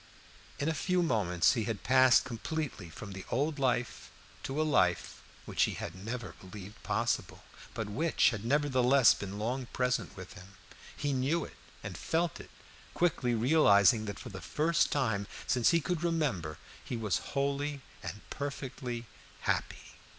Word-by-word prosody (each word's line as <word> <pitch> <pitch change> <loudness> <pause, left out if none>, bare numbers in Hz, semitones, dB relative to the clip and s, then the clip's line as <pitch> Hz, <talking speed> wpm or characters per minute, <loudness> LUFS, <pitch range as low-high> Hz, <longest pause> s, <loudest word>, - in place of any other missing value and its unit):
In 140 - -1
a 160 - +2
few 180 +3 +1
moments 100 - +3
he 115 -4 -1
had 110 -2 -3
passed 130 -1 +6
completely 130 - -4
from 100 +6 -9
the 95 -1 -7
old 145 +4 0
life 125 -2 0 0.3
to 135 +3 -3
a - - +4
life 90 - +1 0.2
which - - +2
he - - -3
had 85 - -5
never 110 +7 -6
believed 100 +1 -10
possible, - - -1 0.3
but 110 - -3
which 150 +10 +2
had 110 -3 -5
nevertheless 130 -1 +4
been 100 0 -6
long 120 +4 -2
present 125 -5 -1
with 95 -1 -9
him. 95 -1 -13 0.4
He 145 -1 -1
knew 140 +6 +1
it - - -12 0.3
and - - -5
felt 165 -1 -1
it, - - -11 0.5
quickly 135 -8 +1
realizing 110 - +5
that 100 - -5
for 120 - -8
the 95 -3 -8
first 165 +3 +1
time 110 -8 0 0.2
since 125 -2 +3
he 170 - +4
could 170 +1 -2
remember 135 - -1 0.3
he 120 - -4
was 105 -5 0 0.2
wholly 140 +1 -1 0.2
and 105 - -6
perfectly 130 -4 -4 0.4
happy. - - -2
125 Hz, 160 wpm, -31 LUFS, 105-145 Hz, 0.5 s, passed